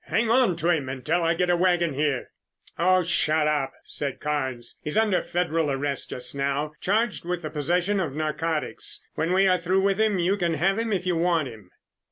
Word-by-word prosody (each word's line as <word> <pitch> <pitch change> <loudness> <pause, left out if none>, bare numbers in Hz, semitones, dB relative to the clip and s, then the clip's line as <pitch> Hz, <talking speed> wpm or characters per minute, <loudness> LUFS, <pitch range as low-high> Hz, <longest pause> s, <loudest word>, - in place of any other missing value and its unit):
"Hang 225 0 +1
on 240 -7 +4
to 165 +2 -1
him 145 -6 0
until 130 +6 -1
I 165 0 +2
get 180 +1 +1
a - - +4
wagon 175 -3 +2
here!" 145 -2 -1 0.5
"Oh, 185 +1 +4
shut 160 -2 +2
up!" 145 -3 0
said 140 -3 -4
Carnes. 130 -5 -3
"He's 150 - -1
under 215 -4 +3
federal 165 -3 -1
arrest 140 0 -2
just 125 - -4
now, 140 +2 -1
charged 215 +3 0
with 175 0 -3
the 155 - -4
possession 175 +7 0
of 155 -7 -2
narcotics. 155 +1 -2
When 165 - -1
we 190 +1 +4
are 185 -1 +3
through 185 +3 +1
with 195 +1 +1
him, 215 -3 +2
you 180 +3 +1
can 170 -3 0
have 195 +7 +1
him 230 -1 -1
if 190 -3 -1
you 180 -1 +1
want 165 -4 +1
him." 110 -5 -13
170 Hz, 205 wpm, -25 LUFS, 150-185 Hz, 0.5 s, on